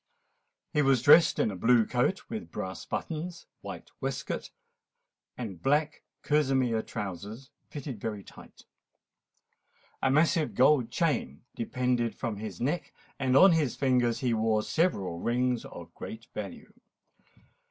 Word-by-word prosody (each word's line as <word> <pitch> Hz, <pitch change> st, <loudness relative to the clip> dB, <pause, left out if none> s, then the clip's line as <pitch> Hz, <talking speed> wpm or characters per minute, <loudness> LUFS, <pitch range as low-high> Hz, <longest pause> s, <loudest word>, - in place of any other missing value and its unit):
He 150 Hz, -, +3 dB
was 135 Hz, -4 st, +3 dB
dressed 160 Hz, +4 st, +7 dB
in 110 Hz, -, +1 dB
a -, -, -6 dB
blue 115 Hz, +4 st, +4 dB
coat 125 Hz, -, 0 dB
with 220 Hz, -1 st, -6 dB
brass 95 Hz, 0 st, -5 dB
buttons, 165 Hz, +2 st, -5 dB, 0.2 s
white -, -, -8 dB
waistcoat, -, -, -3 dB, 0.9 s
and 100 Hz, -8 st, -6 dB
black 150 Hz, +2 st, +1 dB, 0.2 s
kerseymere 130 Hz, -6 st, +2 dB
trousers 105 Hz, +4 st, -6 dB, 0.2 s
fitting 140 Hz, -6 st, -6 dB
very 105 Hz, -2 st, -4 dB
tight. -, -, -15 dB, 1.4 s
A 135 Hz, -, +2 dB
massive 155 Hz, +3 st, +2 dB
gold 130 Hz, -2 st, +4 dB
chain 125 Hz, -, -1 dB
depended 120 Hz, 0 st, -1 dB
from 115 Hz, -5 st, -4 dB
his 105 Hz, -4 st, -7 dB
neck; 150 Hz, +8 st, -2 dB, 0.3 s
and 130 Hz, -1 st, +3 dB
on 190 Hz, +5 st, +8 dB
his 155 Hz, -6 st, +1 dB
fingers 125 Hz, -2 st, +1 dB
he 125 Hz, -3 st, +1 dB
wore 110 Hz, -1 st, +1 dB
several 100 Hz, -, 0 dB
rings 125 Hz, +3 st, 0 dB
of 85 Hz, -1 st, -10 dB
great 110 Hz, +1 st, -8 dB
value. 100 Hz, -4 st, -7 dB
125 Hz, 130 wpm, -29 LUFS, 110-145 Hz, 1.4 s, on